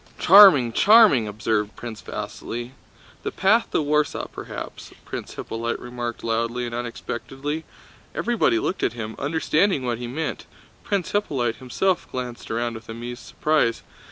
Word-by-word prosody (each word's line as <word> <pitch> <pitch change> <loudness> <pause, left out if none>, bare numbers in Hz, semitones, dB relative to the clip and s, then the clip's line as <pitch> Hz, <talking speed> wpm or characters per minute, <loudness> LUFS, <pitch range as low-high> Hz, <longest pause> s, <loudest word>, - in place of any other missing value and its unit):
"Charming, 175 - +8
charming!" 205 - +6
observed 105 0 -1
Prince 115 -3 -8
Vasíli. 120 +2 -6 0.5
"The - - -2
path 215 +5 +3
to - - 0
Warsaw, 150 +1 0
perhaps," - - -8
Prince - - -7
Hippolyte 115 +1 -3
remarked 120 -1 -5
loudly 115 +2 -1
and 120 - -6
unexpectedly. 135 +5 -5 0.5
Everybody 240 +8 +2
looked 195 - -2
at - - +1
him, 110 -2 -6
understanding 155 +1 +1
what 120 -1 -1
he 120 - -5
meant. 155 +6 -4 0.4
Prince 200 -4 -1
Hippolyte 135 - 0
himself 175 +9 -1
glanced 125 -2 -6
around 115 +1 -1
with 110 0 -10
amused 120 +2 -6
surprise. 150 -7 +1
125 Hz, 135 wpm, -23 LUFS, 115-160 Hz, 0.5 s, Charming